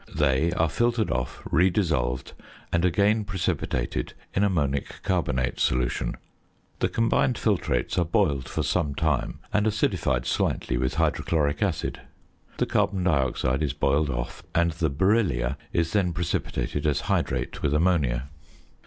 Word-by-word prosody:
They 75 +3 +2
are 80 -2 +2
filtered 115 +6 +1
off, 65 -2 -3
re 90 +3 +5
dissolved, 70 - -1 0.4
and 85 0 +2
again 100 +4 +3
precipitated 95 -2 -2 0.2
in 100 - +2
ammonic 70 -8 -1
carbonate 80 -10 0
solution; 65 -1 0 0.6
the - - +1
combined 115 +2 +2
filtrates 90 - 0
are - - +4
boiled 80 - +1
for - - -1
some 75 -4 0
time, 75 -5 0 0.2
and 105 0 +2
acidified 110 0 0
slightly - - 0
with 65 +3 -1
hydrochloric 80 -2 +1
acid. - - -1 0.6
The - - +1
carbon 95 -3 +1
dioxide 70 -4 +1
is 75 -4 0
boiled 75 +1 +1
off, - - -4
and 85 0 +3
the 80 0 -1
beryllia 80 - +1 0.2
is 85 -1 0
then 95 -4 +2
precipitated 75 -4 -2
as 75 - +1
hydrate - - -1
with 75 - +1
ammonia. 75 -7 +1
80 Hz, 135 wpm, -26 LUFS, 70-95 Hz, 0.6 s, re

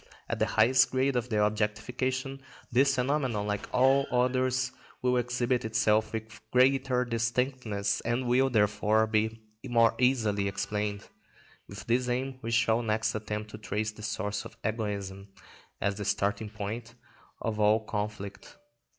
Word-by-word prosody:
At - - -3
the - - +2
highest 125 +1 +4
grade 130 +1 +1
of 125 0 -1
the 105 -2 +3
objectification, 125 +6 -2 0.3
this 135 +2 +4
phenomenon, 130 -5 0
like 105 -1 -3
all 135 +2 +4
others, 125 0 +1 0.3
will 125 0 +3
exhibit 125 0 0
itself 110 -1 +2
with 110 0 -6
greater 130 0 +3
distinctness, 115 -3 -1
and 120 +2 -1
will 130 +2 +3
therefore 110 -1 +3
be 110 0 -1 0.2
more 115 -3 +3
easily 110 -6 +2
explained. 100 +1 -3 0.6
With - - -9
this 125 +2 +1
aim 130 +1 -2
we 115 - -4
shall 115 0 +3
next 110 -1 0
attempt 105 0 -4
to 110 - -8
trace 110 0 -2
the 105 - -13
source 105 -1 -3
of - - -11
egoism 100 -3 -4 0.5
as 100 0 -1
the 105 - -4
starting 105 +3 0
point 110 +2 -6 0.4
of 110 -1 -3
all 105 +1 +4
conflict. 105 -2 -5
110 Hz, 140 wpm, -29 LUFS, 105-125 Hz, 0.6 s, highest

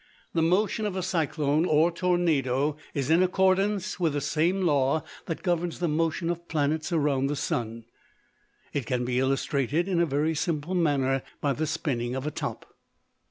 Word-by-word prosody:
The 165 - +2
motion 205 +6 +2
of 195 - -4
a 185 - -2
cyclone 155 -4 +1
or 165 0 +3
tornado 155 -6 +1 0.2
is 140 +1 0
in 165 +2 +5
accordance 190 +2 +1
with 165 -4 +1
the 145 - 0
same 170 +7 +1
law 145 -2 +2 0.2
that 165 - -4
governs 175 -2 0
the 175 - 0
motion 165 +2 0
of 170 0 -6
planets 155 +2 0
around 145 -4 +1
the 145 - -1
sun. 115 -5 -3 0.9
It 135 -5 -2
can 125 -1 0
be 125 0 0
illustrated 135 +4 0
in 185 -3 +1
a 170 - +2
very 150 +3 +1
simple 160 +1 -2
manner 140 -6 +2 0.2
by 140 -1 +1
the 155 +4 -2
spinning 125 -5 -2
of 130 +1 -4
a 150 - -1
top. - - -6
155 Hz, 170 wpm, -27 LUFS, 140-175 Hz, 0.9 s, in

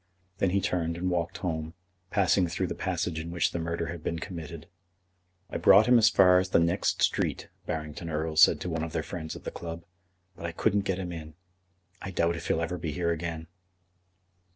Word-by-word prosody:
Then 95 - +2
he 100 +2 +1
turned 85 -3 -1
and 90 +1 -1
walked 85 -1 -1
home, 80 -1 -3 0.3
passing 95 -2 +3
through - - -2
the - - -3
passage 80 -2 -2
in 80 +1 -6
which 85 -1 0
the 85 - -3
murder 85 0 -2
had 85 - -8
been 85 - -2
committed. 85 -1 -7 0.8
"I - - -4
brought 95 +5 +7
him 125 0 +6
as 115 0 +6
far 90 -1 +6
as 95 0 -2
the - - +4
next 85 +3 +1
street," - - 0 0.2
Barrington 80 +1 -4
Erle 80 0 -2
said - - +6
to 90 - -3
one 80 0 -2
of 80 -1 -4
their - - -1
friends 80 -2 -6
at - - -10
the - - -4
club, 85 0 -7 0.5
"but 85 - -5
I 85 - -5
couldn't 100 +3 +1
get 95 -2 0
him 90 -2 -4
in. 80 -2 -8 0.7
I - - -5
doubt 85 -2 +1
if 80 - -6
he'll 80 - +1
ever 90 +2 -3
be 80 -1 -3
here 85 +3 0
again." 85 -1 -4
85 Hz, 210 wpm, -28 LUFS, 80-90 Hz, 0.8 s, brought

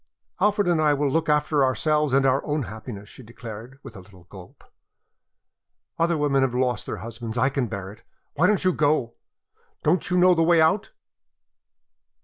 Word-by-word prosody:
"Alfred 205 -2 +2
and 170 -3 +2
I 150 -1 +3
will 140 -1 0
look 160 +2 0
after 150 -1 +2
ourselves 150 +2 +1
and 135 +1 +3
our 135 +1 +2
own 150 -1 -2
happiness," 105 -1 -9
she 130 - -13
declared, 115 +2 -10
with 110 - -11
a - - -9
little 95 -1 -17
gulp. 90 0 -15 1.4
"Other 165 0 +1
women 145 -2 +1
have 130 -2 0
lost 125 -3 -1
their - - -4
husbands. 115 0 -7
I 130 +3 +2
can 135 -3 -2
bear 100 -3 -6
it. 110 +3 -16 0.3
Why 165 +5 +2
don't 205 0 +1
you 185 -1 +2
go? 145 -7 0 0.7
Don't 170 +3 +1
you 180 - +1
know 180 0 +5
the 165 - +1
way 165 0 +4
out?" 160 - +2
135 Hz, 180 wpm, -24 LUFS, 115-160 Hz, 1.4 s, know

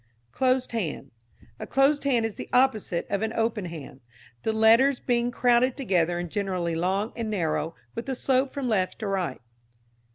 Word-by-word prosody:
Closed 255 - +1
Hand. 170 - -4 0.5
A - - -6
closed 280 +2 +2
hand 245 -5 +2
is 225 - -3
the - - -8
opposite 250 -9 +2
of 200 0 0
an 220 0 -1
open 225 -3 -1
hand, 155 -6 -9 0.4
the 220 - 0
letters 230 +5 +4
being 240 0 0
crowded 245 +1 +2
together 175 - +1
and 175 0 -3
generally 185 -4 -1
long 190 +6 -1
and 230 -2 -3
narrow, 165 -4 -1 0.2
with 230 - -6
the 265 - -1
slope 260 +1 +1
from 275 -3 -3
left 190 -5 0
to 215 - -4
right. 185 -10 -2
220 Hz, 170 wpm, -26 LUFS, 185-250 Hz, 0.5 s, letters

